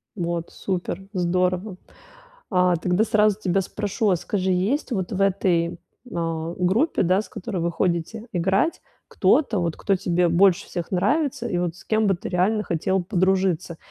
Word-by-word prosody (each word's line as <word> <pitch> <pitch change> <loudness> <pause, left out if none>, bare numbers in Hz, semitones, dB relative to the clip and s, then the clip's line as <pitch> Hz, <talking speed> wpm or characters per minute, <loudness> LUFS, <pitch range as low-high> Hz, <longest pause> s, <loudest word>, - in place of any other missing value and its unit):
Вот 170 -2 -3
супер, 190 0 -4
здорово. 180 +1 0 0.7
А 180 -2 +3
тогда 180 +5 +1
сразу 215 -2 +3
тебя 190 -1 +1
спрошу, 205 +3 -3
вот, 185 -4 +3
скажи, 190 0 -1
есть, 205 +11 0
вот, 190 -5 -2
в 195 - -2
этой, 175 -3 +1 0.4
а, 165 0 -2
группе, 200 - +2
да, 185 +3 +2
с - - -14
которой 185 0 -5
вы 170 - 0
ходите 175 +6 -2
играть, 190 - +1 0.3
кто-то, 240 -10 +2
вот, 170 -2 -2
кто 195 - +1
тебе 175 -1 +1
больше 180 +1 +3
всех 175 -2 -5
нравится 260 - +1
и 175 - -1
вот 175 -2 -1
с - - -15
кем 220 -1 +1
бы 195 - +3
ты - - -6
реально 195 +4 +1
хотел 180 +2 0
подружиться? 185 -3 0
185 Hz, 165 wpm, -23 LUFS, 175-205 Hz, 0.7 s, А